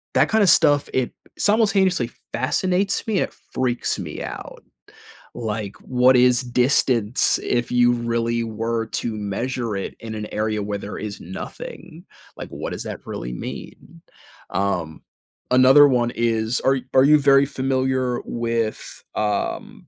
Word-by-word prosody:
that - - +3
kinda 215 -3 +4
stuff 145 -4 +4
it 130 -2 -1 0.2
simultaneously 195 - +2 0.2
fascinates 185 +10 0
me, 210 -4 +1
it - - -2 0.2
freaks 125 -2 -1
me - - -6
out. - - -8 0.7
Like, 105 -2 -4
what 125 0 +3
is 125 0 +4
distance 125 -2 +2
if 120 0 -1
you 120 0 +4
really 115 0 -1
were 115 +1 -2
to 115 -1 -3
measure 115 +2 -3
it 95 - -5
in 110 -1 -7
an 105 0 -5
area 105 0 -1
where 100 0 -3
there 100 +1 -7
is 105 -1 -6
nothing, 160 - -9 0.3
like, - - -7
what - - -6
does - - -5
that - - -7
really - - -5
mean? 165 - -9 0.5
Um, 90 -5 -2 0.5
another 130 +3 +7
one 120 -2 +1
is 115 0 0
are 135 0 +2 0.2
are 130 0 +6
you 150 +1 +6
very 140 0 +5
familiar 130 -2 -1
with, 115 -2 -3
um, 105 -1 -3
120 Hz, 140 wpm, -22 LUFS, 110-135 Hz, 0.7 s, another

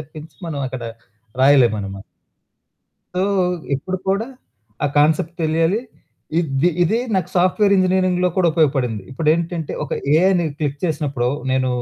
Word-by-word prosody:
తప్పించి 155 +1 -11
మనం 145 -3 -4
అక్కడ 130 -2 -6 0.6
రాయలేం 135 -3 +6
మన 100 - -4
మ 95 - -9 1.1
సో, 185 - 0 0.5
ఇప్పుడు 185 +7 -3
కూడా 200 +4 +1 0.6
ఆ - - +4
కాన్సెప్ట్ 155 +3 +2
తెలియాలి. 165 +7 +1 0.6
ఇద్ది 145 0 +1
ఇదీ 195 +7 +2 0.2
నాకు 185 -3 0
సాఫ్ట్‌వేర్ 190 +3 +3
ఇంజినీరింగ్‌లో 185 -1 +2
కూడా 180 -2 +3
ఉపయోగపడింది. 135 - +1
ఇప్పుడేంటంటే, 165 +3 -1
ఒక 140 - -7 0.2
ఏఐని 180 +1 +3
క్లిక్ 145 -2 -3
చేసినప్పుడు 145 -7 -1 0.2
నేను 130 0 +1
160 Hz, 125 wpm, -20 LUFS, 140-180 Hz, 1.1 s, రాయలేం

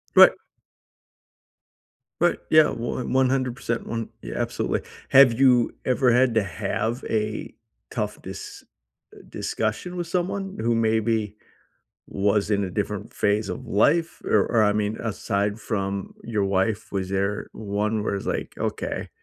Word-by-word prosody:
Right. - - +10 1.9
But, - - +1
yeah, 155 -1 +6
one 120 +2 -3
100%, 130 -3 0
one 115 -1 -3
yeah, - - -7
absolutely. - - -1 0.3
Have 130 -3 +7
you 125 -3 +5
ever 125 -1 +3
had 125 -1 +3
to 110 - +3
have 110 +5 -2
a 110 -1 -2 0.4
tough - - -3
dis - - -8 0.5
uh, - - -13
discussion 115 +12 -3
with 175 -2 -3
someone 190 +2 -2
who 115 +1 +1
maybe 110 -1 +1 0.7
was 100 +1 +1
in 100 -1 +2
a 95 - -4
different - - -3
phase 105 0 +1
of - - -5
life? 160 +11 +2
Or 100 -3 +3
or, 115 -2 +3
I 105 - +3
mean, 105 +1 -1
aside 105 -1 -1
from 100 -2 -3
your 110 -4 0
wife, 100 +3 0
was 95 -1 -2
there 100 +1 -1
one 105 +1 -2
where 100 - -1
it's 95 - -6
like, - - -3
"Okay, - - -3
110 Hz, 140 wpm, -24 LUFS, 100-125 Hz, 1.9 s, Right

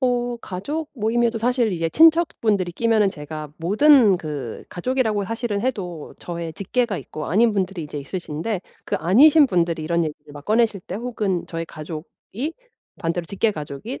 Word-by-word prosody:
어 245 -2 0
가족 290 - -5
모임에도 230 0 +1
사실 240 -2 +1
이제 165 -2 -1
친척분들이 235 - +3
끼면은 220 0 +3
제가 150 -1 -7
모든 215 - +5
그 145 -8 -6
가족이라고 220 0 0
사실은 225 -1 -2
해도 185 - -3
저의 170 -2 -5
직계가 220 +1 -1
있고 155 - -7
아닌 220 +5 +3
분들이 190 -4 -2
이제 150 0 -6
있으신데 175 +5 -4 0.2
그 - - -1
아니신 275 - +6
분들이 170 -5 0
이런 170 +1 +1
얘기를 150 -1 -7
막 145 -1 -10
꺼내실 220 -1 +2
때 180 +2 -6
혹은 215 -6 -2
저희 165 0 -4
가족이 165 - -7 0.5
반대로 170 -1 -1
직계 205 +5 0
가족이 150 - -6
200 Hz, 360 characters per minute, -22 LUFS, 165-235 Hz, 0.5 s, 아니신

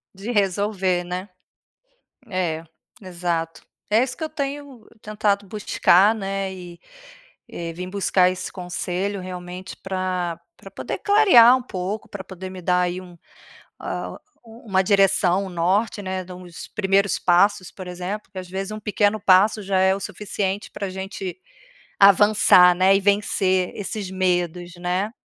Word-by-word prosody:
De 195 +5 -6
resolver, 195 -3 0
né. 180 +2 -5 1.0
É, 170 -4 -2 0.4
exato. 170 -3 -3 0.3
É 220 +4 +4
isso 255 -1 -5
que 320 - -5
eu 315 - -3
tenho 280 -5 -6 0.2
tentado 205 -1 -1
buscar 205 -1 +3
né, 195 -2 -3
e 175 -2 -11 0.7
e 170 -1 -6
vim 180 +2 -6
buscar 185 -1 +2
esse 185 0 -6
conselho, 185 +2 -4
realmente 180 0 -8
pra 185 -3 -3 0.2
pra - - -13
poder - - -5
clarear 375 - +6
um 260 - -2
pouco, 200 -2 -5
pra 195 -2 -7
poder 190 0 -9
me 185 0 -9
dar 180 +1 +2
aí 180 +1 -1
um 180 -1 -13 0.7
hã, - - -4 0.4
um 230 +3 -15
uma 190 -2 +2
direção, 195 -1 +3
um - - -7
norte 185 +6 0
né, 185 -1 -3
de 180 - -13
uns 180 -2 -10
primeiros 200 -1 +1
passos, 185 +1 +2
por 185 -2 -9
exemplo, 180 +4 -5
porque 195 -1 -15
às 185 -1 -6
vezes 195 +3 -4
pequeno 210 0 +1
passo 200 +3 +4
já 190 -1 0
é 190 0 +4
o - - -5
suficiente 200 0 -4
pra 200 - -5
gente 190 - -6 0.6
avançar 200 -2 +6
né, 190 +2 +4
e - - 0
vencer 195 -2 +1
esses 200 -1 -5
medos, 180 -2 -1
né. 180 +5 -2
190 Hz, 150 wpm, -22 LUFS, 180-205 Hz, 1.0 s, clarear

